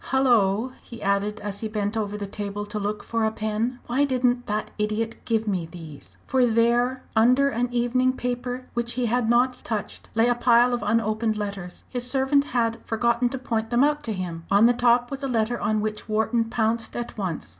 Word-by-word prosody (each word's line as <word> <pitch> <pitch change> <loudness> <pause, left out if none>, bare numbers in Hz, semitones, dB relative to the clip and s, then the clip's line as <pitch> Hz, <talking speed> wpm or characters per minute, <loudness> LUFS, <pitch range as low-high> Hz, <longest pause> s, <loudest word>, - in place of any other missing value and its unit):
"Hullo!" 240 -4 +3
he 235 - -11
added, 200 +2 0
as 205 -1 -5
he 220 - -3
bent 210 0 -2
over 210 -2 -2
the 205 - -4
table 205 +1 -5
to 210 +1 -4
look 205 +1 -3
for 230 -1 -1
a 220 - +3
pen; 220 +3 -2
"why 255 +4 +1
didn't 250 -3 +1
that 210 +1 -2
idiot 215 +2 -1
give 225 -1 0
me 185 -5 -1
these?" 160 -4 -12
For 260 0 +2
there, 240 +3 +2
under 250 +5 +4
an 240 0 -1
evening 245 +2 +2
paper 250 0 -3
which 235 0 -1
he 250 0 -1
had 235 0 +1
not 250 +2 +2
touched, 215 -4 -5
lay 225 +1 +4
a 245 - +4
pile 240 0 +4
of 240 - -1
unopened 220 -1 0
letters. 200 -4 -5
His 245 -1 -2
servant 275 +2 +2
had 230 -3 0
forgotten 235 +2 +1
to 265 - -4
point 225 -3 -2
them 240 +2 +3
out 295 +1 +2
to 225 - -2
him. 175 -4 -5
On 200 +3 +5
the 240 - +5
top 240 +1 +3
was 275 0 -5
a 275 - -1
letter 235 -1 0
on 215 0 +1
which 215 +1 -4
Wharton 220 +2 +1
pounced 230 0 -1
at 240 0 -5
once. 185 - -4
230 Hz, 205 wpm, -25 LUFS, 210-245 Hz, -, On